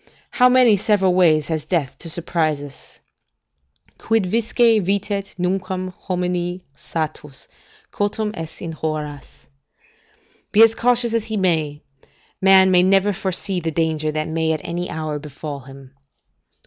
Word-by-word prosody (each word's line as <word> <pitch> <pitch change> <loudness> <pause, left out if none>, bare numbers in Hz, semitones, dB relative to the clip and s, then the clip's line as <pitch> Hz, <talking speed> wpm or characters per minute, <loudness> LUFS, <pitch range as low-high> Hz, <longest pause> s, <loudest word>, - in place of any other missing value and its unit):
How 250 -1 +4
many 250 -4 +5
several 195 -2 +2
ways 160 -5 +3
has 160 -2 -2
death 160 -8 -2
to 165 - -5
surprise 160 -2 0
us? 145 -1 -12 1.0
"Quid 220 -4 0
quisque, 230 0 -2 0.3
vitet, 200 +1 -2
nunquam 185 0 -2
homini 180 0 -3
satis 155 -4 -6 0.4
Cautum 210 +1 -2
est 160 -1 -8
in 165 - -4
horas." 150 -3 -6 1.1
["Be 215 +2 +7
as 225 0 +5
cautious 240 0 +2
as 230 -2 0
he 220 -1 -3
may, 160 -6 0 0.6
man 190 -1 +6
can 180 +1 +4
never 195 +1 +3
foresee 190 +1 -2
the 165 -1 -3
danger 155 -1 -1
that 155 0 -3
may 160 0 -1
at 155 - -4
any 175 +1 -4
hour 155 -2 -4
befal 145 0 -7
him." 135 0 -14
180 Hz, 135 wpm, -20 LUFS, 155-195 Hz, 1.1 s, Be